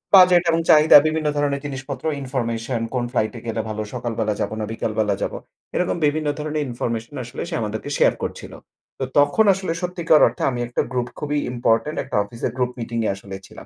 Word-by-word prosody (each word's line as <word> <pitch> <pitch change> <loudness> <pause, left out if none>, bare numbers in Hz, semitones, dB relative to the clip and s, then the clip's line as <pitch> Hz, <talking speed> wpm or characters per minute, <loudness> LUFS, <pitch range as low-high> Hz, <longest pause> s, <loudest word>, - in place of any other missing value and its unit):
Budget 180 -2 +7
এবং 165 0 +3
চাহিদা, 155 0 +8
বিভিন্ন 155 0 -1
ধরনের 140 -1 0
জিনিসপত্র, 135 -1 -6 0.2
ইনফরমেশন, 120 -2 -2
কোন 125 -2 0
ফ্লাইট 110 -4 0
এ - - -6
গেলে 115 - -1
ভালো, 110 0 -3
সকালবেলা 115 -3 -2
যাব - - -1
না 110 - -2
বিকালবেলা 110 -2 0
যাব, - - -2 0.4
এরকম 180 - 0
বিভিন্ন 150 +1 0
ধরনের 150 0 -2
ইনফরমেশন 115 +2 -4
আসলে 120 - -7
সে 170 - -3
আমাদেরকে 110 +5 -4
শেয়ার - - +4
করছিল। - - -6 0.5
তো - - -1 0.2
তখন 145 +10 +4
আসলে 190 -2 -3
সত্যিকার 175 -3 +3
অর্থে 115 - -4
আমি 125 - -4
একটা 120 - -1
গ্রুপ 125 -1 -1
খুবই 150 0 -1
ইম্পোর্টেন্ট 120 +4 +1
একটা - - -3
অফিসের 115 +3 -4
গ্রুপ 125 -1 0
মিটিং 115 0 -4
এ - - +2
আসলে 95 0 -9
ছিলাম। - - -12
125 Hz, 190 wpm, -22 LUFS, 115-150 Hz, 0.5 s, চাহিদা